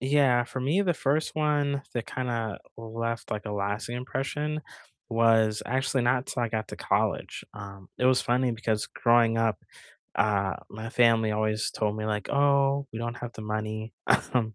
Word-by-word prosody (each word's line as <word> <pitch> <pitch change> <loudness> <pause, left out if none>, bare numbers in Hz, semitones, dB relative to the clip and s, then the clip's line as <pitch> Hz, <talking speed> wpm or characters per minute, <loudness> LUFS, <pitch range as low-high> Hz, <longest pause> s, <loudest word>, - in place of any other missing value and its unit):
Yeah, 130 -2 +3
for 130 +2 -5
me, 150 +10 +2
the 180 -3 +1
1st 150 +2 0
one 145 -2 +1
that 120 -2 -2
kinda 115 -4 -2 0.2
left, 115 +1 -4
like, 105 -1 -3
a 105 - -3
lasting 105 +4 -2
impression 150 +4 -2 0.5
was 115 -2 +3
actually 130 +1 +1
not 125 +2 +2
'till 125 - -2
I 120 - 0
got 110 0 -3
to - - -7
college, - - -1
um, 100 -2 -9
it 125 - +3
was 130 0 +5
funny 125 +1 +2
because 110 -1 -1
growing 115 -1 +3
up, 110 -4 +1 0.6
uh, 100 -2 +1
my 110 +2 -6
family 115 -2 +4
always 110 0 0
told 105 -1 -1
me 110 - -3
like, 105 -1 -2
"Oh, 140 0 +3
we 110 - -5
don't 120 0 -3
have 120 -1 -6
the 110 - -7
money," 110 +1 -3 0.4
um, 110 -3 +1
115 Hz, 175 wpm, -28 LUFS, 110-130 Hz, 0.6 s, was